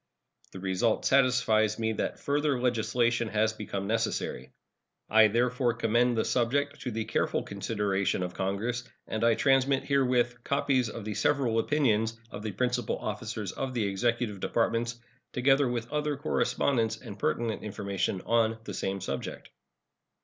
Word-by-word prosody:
The 95 - -8
result 95 +4 0
satisfies 125 -5 +3
me 110 -1 0
that - - -2
further 145 -2 0
legislation 120 -1 +1
has 110 0 +1
become 100 -2 -4
necessary. 110 - -2 0.6
I 110 0 +7
therefore 120 +2 +1
commend 120 +1 +2
the 110 - +1
subject 140 +4 0
to 125 - -3
the 110 -1 -3
careful 110 - 0
consideration 100 -3 -1
of 90 0 -4
Congress, 110 +6 -2 0.2
and 110 - -3
I 115 -1 +5
transmit 135 +1 +3
herewith 125 -3 +1
copies 135 -3 +1
of 110 -1 -7
the 105 - -3
several 120 -2 +1
opinions 115 -4 +1
of - - -7
the 110 0 -3
principal 125 +1 0
officers 105 -1 -4
of 130 -1 -4
the 115 -3 +1
Executive 105 +1 -1
Departments, 115 +2 0 0.3
together 135 +2 +3
with 120 0 -3
other 150 -1 0
correspondence 115 -5 0
and 105 -5 -10
pertinent 115 0 -1
information 100 -2 -2
on 115 0 +2
the - - -6
same 95 0 -2
subject. 70 -3 -5
115 Hz, 145 wpm, -29 LUFS, 105-125 Hz, 0.6 s, I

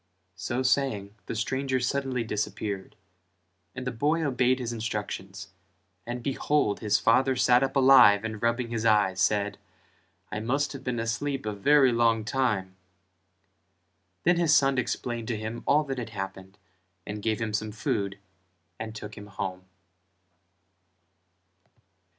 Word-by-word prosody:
So 120 +8 -3
saying 125 -7 0
the - - -4
stranger 130 +3 -1
suddenly 130 -1 -1
disappeared; 105 -2 -4 0.8
and 130 0 -6
the 125 - -1
boy 150 +7 0
obeyed 130 -2 +2
his 120 -2 -4
instructions 105 -3 -5 0.6
and 120 0 -4
behold 140 -4 0
his 105 -1 +2
father 130 +3 +3
sat 125 0 +4
up 135 0 -1
alive 130 -7 +7
and 110 -1 -5
rubbing 115 +1 0
his 115 -2 -2
eyes 105 -4 +3
said 105 +1 +1 0.7
"I 105 - -3
must 140 +7 -1
have 135 -1 -8
been 125 -2 -2
asleep 135 +4 -2
a 105 - -2
very 135 +6 +4
long 115 -2 +2
time." 105 -7 -1 1.5
Then 175 +1 +4
his 165 -3 +4
son 135 -1 +2
explained 120 -1 -3
to 115 - -2
him 110 +2 -5
all 150 +2 +4
that 135 -3 -4
had 115 - -5
happened 95 -1 -7 0.5
and 105 0 -5
gave 110 0 0
him 110 -2 -3
some 110 +1 -2
food 100 -2 -2 0.6
and 110 0 -6
took 105 0 -8
him 105 - -10
home. 95 -2 -5
115 Hz, 140 wpm, -27 LUFS, 105-130 Hz, 1.5 s, alive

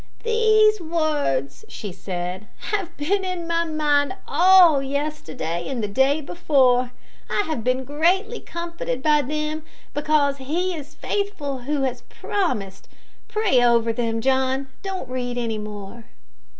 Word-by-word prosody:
"These 435 -2 +4
words," 295 - -1
she 205 - -6
said, 180 +2 -5 0.2
"have 400 -5 -2
been 380 +7 0
in 365 -2 -3
my 335 0 +1
mind 300 0 +1
all 355 -5 +6
yesterday 265 - -3
and 245 -5 -3
the - - 0
day 265 +8 +2
before. 260 -6 +2 0.4
I - - +1
have 310 -8 -3
been 255 +2 +1
greatly 360 - +1
comforted 335 -7 -5
by 300 -1 +4
them, 305 +3 -3 0.3
because 295 -1 +2
`He 345 +7 -1
is 300 -1 -9
faithful 395 -10 -2
who 275 +3 -1
has 255 -2 -2
promised.' 245 - -2 0.4
Pray 420 - +2
over 235 -1 +3
them, 225 -1 -1
John; 265 +1 +1
don't 380 -8 -4
read 245 -1 -3
any 230 -3 -2
more." 210 +2 -8
285 Hz, 135 wpm, -23 LUFS, 245-340 Hz, 0.4 s, all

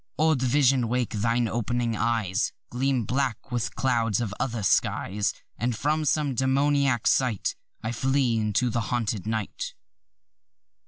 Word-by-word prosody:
Old 155 -2 +3
visions 130 -1 +3
wakeâthine 115 0 0
op'ning 120 +1 -1
eyes 110 -4 0 0.2
Gleam 130 -1 0
black 130 +2 -2
with 120 -1 -2
clouds 115 -5 +1
of 110 -5 -2
other 115 -5 -2
skies, 100 +2 +1 0.3
And 120 0 0
as - - -10
from 155 +3 +1
some 145 -1 +1
demoniac 135 -1 +2
sight 125 -7 +1 0.3
I 110 - -2
flee 130 -2 +1
into 110 +3 +1
the 120 - 0
haunted 110 -4 -2
night. 110 -2 -3
120 Hz, 130 wpm, -26 LUFS, 110-130 Hz, 0.3 s, Old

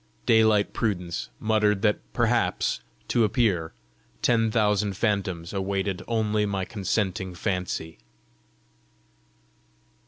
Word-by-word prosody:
Daylight 110 -2 +4
prudence 90 -6 -2
muttered 105 -2 +2
that 105 -1 +3
perhaps, - - +1 0.3
to 120 - +2
appear, 100 -8 +1 0.5
ten 115 -2 +3
thousand 105 -3 +1
phantoms 95 -6 -1
awaited 95 -1 -1
only 110 -2 +1
my 95 -2 -2
consenting 95 -2 -2
fancy. 90 -3 -3
100 Hz, 90 wpm, -26 LUFS, 95-110 Hz, 0.5 s, Daylight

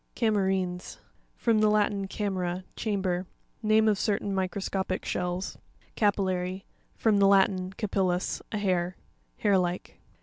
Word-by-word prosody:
Cam'ERINES.— 190 -5 0 0.4
From 230 -2 +2
the 215 0 +4
Latin, 205 -2 +1
ca 205 +2 -3
mera, 180 -1 -2
chamber. 190 -4 -1 0.3
Name 220 0 +4
of 210 -3 +3
certain 205 -2 0
microscopic 190 0 -2
shells 180 +1 -2 0.4
(page 205 -2 +3
32). - - -2
Cari'LLary.—From 185 +3 -2
the 200 - +6
Latin, 190 -1 +3
capil 195 -2 0
lus, 180 +1 -1
a 215 - -1
hair. 185 -3 0 0.4
Hair 200 -3 +3
like. 180 0 -3
195 Hz, 135 wpm, -28 LUFS, 185-205 Hz, 0.4 s, the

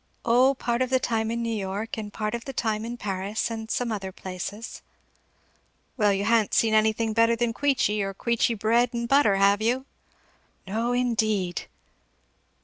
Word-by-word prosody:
"O 255 +4 +4
part 240 -1 -1
of 255 - +1
the 260 0 +3
time 225 -3 -1
in 235 +1 -2
New 230 -1 -1
York, 205 +2 -4
and 210 -2 -6
part 215 +1 -3
of 235 -1 -4
the 270 - -6
time 220 -2 -1
in 240 +1 -5
Paris, 200 +2 -3
and 220 -1 -6
some 245 -1 -1
other 195 -3 -4
places." 190 +4 -7 1.1
"Well 210 -4 +3
you 200 +1 0
ha'n't 225 -2 +2
seen 225 -1 +3
anything 220 +1 +2
better 230 +1 +4
than 235 0 -1
Queechy, 240 -6 +1
or 195 0 -3
Queechy 235 +2 +1
bread 235 +3 +2
and 235 0 -2
butter, 275 -7 +4
have 200 +1 +3
you?" 250 +4 0 0.8
"No 225 +5 -1
indeed!" 220 -7 0
225 Hz, 170 wpm, -26 LUFS, 210-235 Hz, 1.1 s, O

